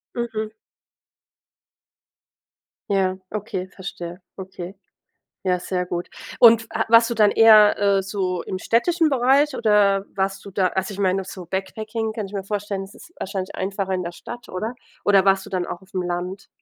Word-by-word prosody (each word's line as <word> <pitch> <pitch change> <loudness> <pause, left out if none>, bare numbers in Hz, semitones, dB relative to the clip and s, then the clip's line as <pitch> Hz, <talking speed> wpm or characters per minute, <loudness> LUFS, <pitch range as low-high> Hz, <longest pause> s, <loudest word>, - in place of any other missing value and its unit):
Mhm. 220 -2 -3 2.4
Ja, 190 -2 +1
okay, 195 -3 -4
verstehe. 180 -2 -8 0.2
Okay. 185 -1 -8 0.7
Ja, 185 -1 +1
sehr 180 0 -2
gut. 175 0 -4 0.3
Und 230 -2 +7
f - - -13
a - - 0
warst 230 0 +7
du - - -1
dann 210 -2 +5
eher, 215 -2 +7
äh, 200 -1 +3
so 185 -2 -2
im 185 - -5
städtischen 325 - +2
Bereich 275 +2 +3
oder 205 -4 +3
warst 195 0 -2
du 200 - -9
da 190 -1 +1
also 190 +3 -2
ich 200 - -7
meine, 190 0 +1
so 185 -1 -9
Backpacking, 215 +4 -3
kann 215 -2 -4
ich 195 - -13
mir 195 -1 -3
vorstellen, 205 -1 -3
das 195 +2 -11
ist 345 - -15
wahrscheinlich 190 -1 -4
einfacher 195 0 -2
in 180 - -1
der 170 0 -5
Stadt, 240 +6 -10
oder? 215 +6 -4 0.3
Oder 200 -2 +5
warst 195 0 +3
du - - -11
dann 180 -2 -1
auch 175 - -6
aufm 190 -1 -5
Land? 180 +2 -4
195 Hz, 175 wpm, -22 LUFS, 185-215 Hz, 2.4 s, Und